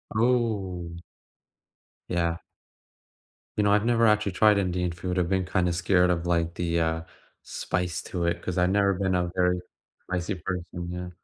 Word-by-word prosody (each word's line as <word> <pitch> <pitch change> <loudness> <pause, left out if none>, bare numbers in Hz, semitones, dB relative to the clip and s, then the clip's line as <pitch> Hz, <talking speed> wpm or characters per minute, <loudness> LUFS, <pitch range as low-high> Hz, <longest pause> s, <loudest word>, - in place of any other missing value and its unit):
Oh. 105 -8 0 1.1
Yeah. 85 -1 0 1.2
You 105 - +3
know, 100 - +3
I've 105 +2 +3
never 115 -1 +4
actually 105 -1 +3
tried 105 +2 +4
Indian 90 -2 0
food, 90 +1 -2
I've 85 - +1
been 95 -1 +1
kinda 90 -1 +1
scared 90 +1 +3
of, 85 -1 0
like, 85 -1 +1
the, 85 -1 0
uh, 80 0 0 0.4
spice 90 -3 -2
to 90 - -3
it 85 0 0
'cause 90 0 -4
I've 90 0 +3
never 100 0 +3
been 95 0 0
a 90 -1 0
very 90 0 +2 0.4
spicy 90 +2 -2
person. 90 -1 -5
Yeah. 90 0 -5
90 Hz, 160 wpm, -26 LUFS, 85-100 Hz, 1.2 s, never